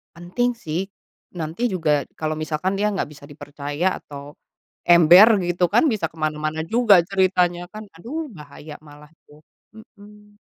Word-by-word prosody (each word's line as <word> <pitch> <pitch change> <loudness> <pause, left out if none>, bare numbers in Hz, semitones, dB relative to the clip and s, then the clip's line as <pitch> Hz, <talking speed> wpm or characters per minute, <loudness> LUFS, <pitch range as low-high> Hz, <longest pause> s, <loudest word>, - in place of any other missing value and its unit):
Penting 185 +9 -2
sih, 170 -6 -4 0.5
nanti 165 +9 -3
juga 155 -7 -1
kalau 155 0 -3
misalkan 155 +4 -2
dia 210 - +1
nggak 185 - -3
bisa 145 -1 -14
dipercaya 145 +4 -4
atau 145 0 -11 0.6
ember 175 +6 +7
gitu 175 0 0
kan, 235 - +3
bisa 180 -7 -2
ke 160 - -25
mana-mana 155 +1 -3
juga 220 0 +4
ceritanya 180 -2 0
kan, 215 +2 -10
aduh 290 - -6
bahaya 150 -1 -12
malah 150 0 -16
itu. 150 -1 -22 0.3
Mhm. 210 -1 -18
175 Hz, 145 wpm, -21 LUFS, 155-205 Hz, 0.6 s, ember